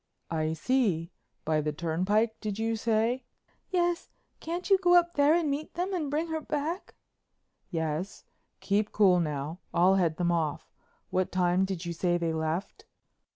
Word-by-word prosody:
"I 155 -1 0
see—by 165 -6 -1
the 150 0 -1
turnpike, 185 +8 0
did 210 -2 -4
you 225 +1 0
say?" 225 +3 +1 0.5
"Yes. 350 -1 0 0.3
Can't 345 +3 -4
you 390 -2 +5
go 355 -1 +4
up 345 0 +4
there 290 +2 +4
and 340 -3 +1
meet 290 +2 -4
them 365 +3 -2
and 320 -6 -1
bring 305 +3 0
her 320 -1 -2
back?" 305 +5 -3 0.7
"Yes—keep 180 +5 -3
cool 190 -4 +5
now, 150 +1 -3 0.2
I'll 185 +3 +5
head 165 -3 +1
them 175 -1 +1
off. 160 -4 -2 0.4
What 185 0 0
time 180 +1 +2
did 190 -3 -4
you 170 - -3
say 175 +1 +1
they 165 -1 -1
left?" 160 +3 -3
195 Hz, 155 wpm, -29 LUFS, -, 0.7 s, you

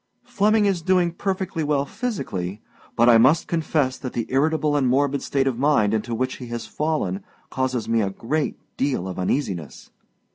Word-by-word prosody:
Flemming 210 +1 +2
is 195 -4 +1
doing 180 0 +2
perfectly 185 -2 -2
well 145 -2 +1
physically; 130 - -4 0.4
but 120 0 +4
I 115 -2 +7
must 135 +8 +4
confess 155 -5 0
that 130 - -6
the 115 - -2
irritable 150 +2 +1
and 140 -3 +2
morbid 140 +2 +2
state 135 -1 0
of 130 -3 -1
mind 130 -8 +3
into 115 +2 -1
which 130 +3 -2
he 125 - -8
has 120 -1 -5
fallen 160 +5 -2 0.3
causes 130 -3 -1
me 115 0 +2
a 100 - 0
great 140 +10 -2 0.2
deal 130 -9 0
of 95 0 -5
uneasiness. 90 - -3
135 Hz, 175 wpm, -23 LUFS, 115-160 Hz, 0.4 s, I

